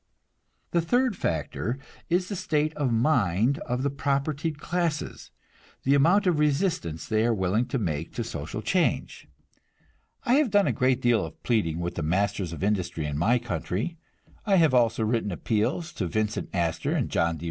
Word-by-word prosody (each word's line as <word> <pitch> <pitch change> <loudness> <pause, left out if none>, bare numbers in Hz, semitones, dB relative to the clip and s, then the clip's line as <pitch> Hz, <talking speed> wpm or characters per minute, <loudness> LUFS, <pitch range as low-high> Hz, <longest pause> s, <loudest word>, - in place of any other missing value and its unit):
The 170 - +2
third 245 +6 +1
factor 110 - -2 0.3
is 180 +1 +1
the 200 - -4
state 155 -3 0
of 145 -5 -1
mind 115 - +2
of 125 +1 -1
the 140 - +1
propertied 140 +2 -1
classes, 170 -1 -2 0.5
the 135 - +3
amount 170 +9 +4
of 175 -5 +2
resistance 150 - 0
they 110 0 +2
are 115 0 +2
willing 100 +5 +1
to - - -1
make 80 - -2
to - - -1
social 80 +9 -5
change. 175 - 0 1.0
I 245 +3 +3
have 285 - 0
done 205 -1 +4
a - - +2
great 130 -1 +1
deal 120 -4 +3
of 80 -1 -9
pleading 85 -9 0
with 85 0 -2
the - - -4
masters 95 +2 0
of 85 - -6
industry 90 -6 -1
in 75 -1 -3
my 100 +11 +3
country; 115 - -3 0.4
I 200 -2 +3
have 160 -6 +4
written 115 -3 +2
appeals 110 - -1
to 95 - -2
Vincent 105 +3 -2
Astor 85 -3 -1
and - - 0
John 85 0 0
D. - - -12
120 Hz, 170 wpm, -26 LUFS, 95-155 Hz, 1.0 s, amount